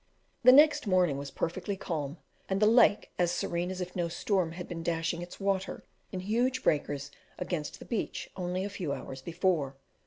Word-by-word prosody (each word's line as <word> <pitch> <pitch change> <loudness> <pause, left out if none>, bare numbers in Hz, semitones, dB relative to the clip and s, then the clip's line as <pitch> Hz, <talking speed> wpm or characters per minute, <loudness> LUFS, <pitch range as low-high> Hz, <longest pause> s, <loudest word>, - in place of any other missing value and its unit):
The 255 - +9
next 295 -2 +6
morning 180 -7 +3
was 140 0 -5
perfectly 185 +6 -3
calm, 155 -4 -3 0.3
and 190 0 +1
the 210 - +5
lake 225 -1 +5
as 175 -1 +3
serene 175 0 -1
as 185 0 -4
if 180 0 -5
no 175 -2 0
storm 175 0 0
had 180 +1 -7
been 165 -1 -5
dashing 165 0 -1
its 175 - -9
water 195 -1 -1 0.3
in 185 - -4
huge 245 +6 0
breakers 145 -1 0 0.3
against 160 -5 -3
the - - -11
beach 230 - -3
only 180 0 -2
a - - -3
few 175 -7 -3
hours 135 -1 -7
before. 165 -4 0
180 Hz, 185 wpm, -30 LUFS, 165-195 Hz, 0.3 s, The